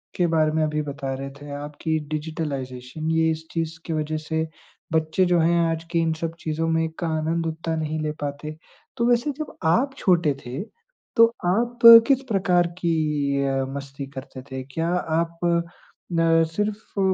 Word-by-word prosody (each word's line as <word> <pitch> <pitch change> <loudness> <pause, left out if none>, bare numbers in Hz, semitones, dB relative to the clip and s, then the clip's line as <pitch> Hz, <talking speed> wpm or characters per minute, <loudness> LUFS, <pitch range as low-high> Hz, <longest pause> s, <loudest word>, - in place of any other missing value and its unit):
के 175 -1 +2
बारे 155 -2 +2
में 155 0 +1
अभी 150 0 0
बता 140 -2 -4
रहे 135 +1 -5
थे 145 0 -8
आप 150 0 -8
कि 160 -1 +1
डिजिटलाइज़ेशन, 150 -2 -4
ये 160 0 +3
इस 160 0 -5
चीज़ 165 -1 -3
की 165 - -3
वजह 155 0 -1
से 160 +1 -2 0.5
बच्चे 160 +4 +2
जो 175 -1 +3
हैं 170 +1 +3
आज 165 0 -3
के 170 - +2
इन 165 -1 +1
सब 165 0 -2
चीज़ों 160 +1 -2
में 160 0 +1
का 170 - -1
आनंद 165 +1 -1
उतना 160 0 -3
नहीं 155 0 -2
ले 150 - -1
पाते। 145 +2 -4 0.4
तो 235 - +1
वैसे 240 +5 +2
जब 305 - -5 0.2
आप 270 +5 +1
छोटे 170 - +3
थे 125 +6 -4 0.5
तो 230 - +8 0.2
आप 235 +6 +1 0.3
किस 270 -1 +3
प्रकार 180 -4 +3
की 150 -4 +1
अ, 135 -1 0
मस्ती 140 0 -6
करते 130 -1 -8
थे? 130 0 -4
क्या 160 +6 -3 0.3
आप 170 0 -3 0.7
न 165 0 +4
सिर्फ़ 210 +2 -3
160 Hz, 175 wpm, -24 LUFS, 150-170 Hz, 0.7 s, तो